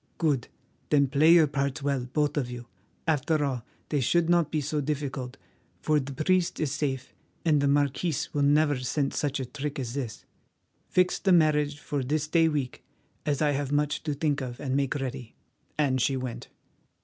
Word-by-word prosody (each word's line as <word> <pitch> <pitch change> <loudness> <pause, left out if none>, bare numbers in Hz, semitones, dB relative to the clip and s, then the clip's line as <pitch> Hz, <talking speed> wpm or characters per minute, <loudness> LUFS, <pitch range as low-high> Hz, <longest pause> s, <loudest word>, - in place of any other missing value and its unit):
"Good. 145 -7 +1 0.4
Then 140 -1 +4
play 150 +4 +5
your 170 -2 +7
parts 140 -1 -2
well, 140 -3 0
both 150 0 +1
of 135 -5 -1
you. 120 -1 -7 0.4
After 155 0 +1
all, 130 -4 -2 0.3
they 145 - +1
should 170 +6 +2
not 170 -3 +3
be 155 - 0
so 150 +1 -1
difficult, 135 -3 -3 0.4
for 155 -1 +2
the 140 0 -5
priest 175 +5 +1
is 150 -4 0
safe, 135 -3 -3 0.3
and 150 -3 +4
the 140 - +2
marquis 145 +3 +1 0.2
will 145 - 0
never 145 -1 +3
scent 135 +2 -1
such 145 -1 -1
a 130 - -2
trick 145 +3 -5
as 125 -4 -4
this. 130 -5 -5 0.6
Fix 180 0 +2
the 190 - +2
marriage 150 -3 +3
for 145 -2 -3
this 150 +3 -1
day 165 +1 +4
week, 145 -5 -3 0.4
as 145 0 +1
I 150 - +3
have 140 -1 -2
much 150 +1 +1
to 150 -3 -2
think 145 -1 0
of 125 -2 -6
and 135 -2 -2
make 140 0 0
ready," 130 -4 -5 0.4
and 135 -4 +2
she 135 +2 +1
went. 125 -2 -5
145 Hz, 185 wpm, -27 LUFS, 135-150 Hz, 0.6 s, your